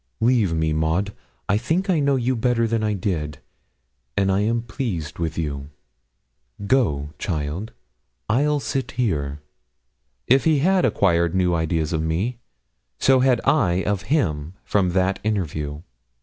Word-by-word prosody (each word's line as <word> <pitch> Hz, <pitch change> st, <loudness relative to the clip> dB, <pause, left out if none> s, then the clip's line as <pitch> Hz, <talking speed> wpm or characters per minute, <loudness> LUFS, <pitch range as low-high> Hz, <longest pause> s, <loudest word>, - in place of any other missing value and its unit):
Leave 115 Hz, -5 st, +3 dB
me, 80 Hz, -1 st, 0 dB
Maud. 80 Hz, +6 st, 0 dB, 0.3 s
I 105 Hz, -, +2 dB
think 170 Hz, -, 0 dB
I 180 Hz, -5 st, +2 dB
know 140 Hz, -1 st, +2 dB
you 130 Hz, 0 st, 0 dB
better 115 Hz, 0 st, +1 dB
than 115 Hz, -1 st, 0 dB
I 105 Hz, -1 st, +1 dB
did, 80 Hz, -7 st, -2 dB, 0.8 s
and 95 Hz, -1 st, +2 dB
I 95 Hz, -, +2 dB
am 115 Hz, +3 st, 0 dB
pleased 115 Hz, -, -4 dB
with 80 Hz, -2 st, -2 dB
you. 70 Hz, -3 st, -3 dB, 1.0 s
Go, 75 Hz, -, +1 dB
child 80 Hz, +4 st, -3 dB, 0.6 s
I'll 145 Hz, +6 st, +2 dB
sit 135 Hz, +1 st, -3 dB
here.' 75 Hz, -, -1 dB, 0.8 s
If 130 Hz, +2 st, +4 dB
he 160 Hz, -2 st, +4 dB
had 185 Hz, +6 st, +3 dB
acquired 85 Hz, -3 st, +2 dB
new 90 Hz, -2 st, +2 dB
ideas 80 Hz, -1 st, 0 dB
of 80 Hz, -, 0 dB
me, 90 Hz, +10 st, -1 dB, 0.6 s
so 130 Hz, -1 st, +4 dB
had 130 Hz, -1 st, +3 dB
I 95 Hz, -, +3 dB
of 100 Hz, -2 st, -1 dB
him 85 Hz, -, 0 dB
from 90 Hz, -4 st, +1 dB
that 95 Hz, +1 st, +1 dB
interview. 80 Hz, -8 st, -2 dB
100 Hz, 145 wpm, -23 LUFS, 80-125 Hz, 1.0 s, If